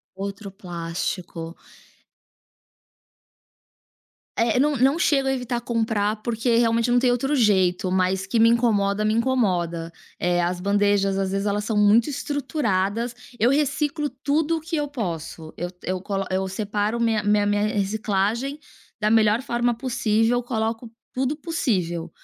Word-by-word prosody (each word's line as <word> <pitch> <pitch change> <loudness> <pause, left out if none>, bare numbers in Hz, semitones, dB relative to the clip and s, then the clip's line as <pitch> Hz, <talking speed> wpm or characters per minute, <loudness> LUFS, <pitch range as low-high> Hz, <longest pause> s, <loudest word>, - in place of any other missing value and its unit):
Outro 200 +1 -6
plástico. 170 -2 -5 2.8
É, 230 +1 +2
não, 290 +1 +2
não 270 +5 +3
chego 280 -6 +2
a 270 - +2
evitar 245 -2 -2
comprar, 225 -3 0
porque, 230 0 0
realmente, 230 0 +2
não 245 0 +4
tem 250 0 +3
outro 270 +4 0
jeito, 190 -6 +2
mas 190 +1 +1
que 210 +4 0
me 225 - +6
incomoda, 215 -4 +2
me 215 0 +2
incomoda, 185 -9 0 0.3
eh, 175 0 +1
as 175 +1 -1
bandejas, 200 0 +2
às 195 -1 -1
vezes, 195 +1 -1
elas 205 0 -1
são 220 -1 -1
muito 210 +5 +4
estruturadas. 240 -7 -1 0.2
Eu 235 +2 +3
reciclo 295 +1 0
tudo 295 +5 -1
que 325 +2 -4
eu 295 -1 -1
posso, 165 - -5
eu 175 - -3
eu 185 0 -2
colo 195 0 -2
eu 190 +1 0
separo 205 +3 -2
minha 225 -2 +1
minha 205 0 +3
minha 205 0 +1
reciclagem 215 +5 -1 0.4
da 210 - +2
melhor 220 +1 +4
forma 240 -2 0
possível, 230 -1 +1
coloco 225 -1 -3 0.2
tudo 265 +3 -1
possível. 210 - -2
220 Hz, 140 wpm, -23 LUFS, 195-245 Hz, 2.8 s, me